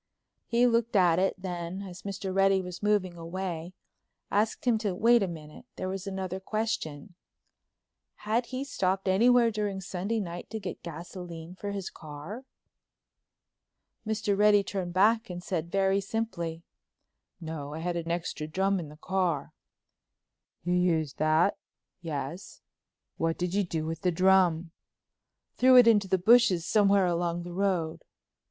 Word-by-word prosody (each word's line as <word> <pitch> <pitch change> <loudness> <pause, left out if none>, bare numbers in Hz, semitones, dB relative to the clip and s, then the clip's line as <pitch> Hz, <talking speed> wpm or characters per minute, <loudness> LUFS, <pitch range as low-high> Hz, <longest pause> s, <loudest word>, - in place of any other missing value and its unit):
He 235 +1 +3
looked 230 -1 +1
at 180 -3 +4
it, 195 +1 0
then, 180 0 -5
as 185 -2 -9
Mr. 195 -1 -4
Reddy 195 0 +4
was 180 -1 -7
moving 205 -4 +1
away, 175 0 -5 0.6
asked 215 +4 0
him 235 -3 +3
to 205 -4 -2
wait 235 +4 +5
a 195 - +1
minute; 155 -3 -9
there 185 - -4
was 195 +1 -5
another 190 -1 -4
question—had 215 +3 -5
he 260 +2 -4
stopped 195 -8 -1
anywhere 235 +5 +5
during 205 -2 -2
Sunday 195 +4 -3
night 175 -3 -6
to 220 - -4
get 190 -4 -6
gasoline 170 0 -8
for 200 +2 -6
his 200 -2 -4
car? 155 - -9 1.6
Mr. 215 -2 0
Reddy 205 0 +5
turned 190 -2 -4
back 220 +4 +3
and 175 0 -6
said 170 -2 -3
very 195 0 +2
simply: 185 -6 -3 0.8
"No, 155 -3 -6
I - - -5
had 175 +1 -2
an 170 -1 -3
extra 165 -2 -3
drum 190 +4 +1
in 160 -4 -6
the 150 - -13
car." 180 -4 -1 1.1
"You 175 +2 0
used 165 -5 +1
that?" 155 +5 +3 0.4
"Yes." 155 +2 -6 0.5
"What 165 0 0
did 180 0 -2
you 205 +1 +2
do 160 -3 -3
with 165 0 -4
the 185 - +2
drum?" 180 -2 +3 0.9
"Threw 255 0 +7
it 245 - +9
into 210 -4 +4
the 190 - +2
bushes 195 -3 +5
somewhere 200 -1 +4
along 175 0 -1
the 175 0 -7
road." 180 -4 -1
185 Hz, 145 wpm, -28 LUFS, 170-205 Hz, 1.6 s, it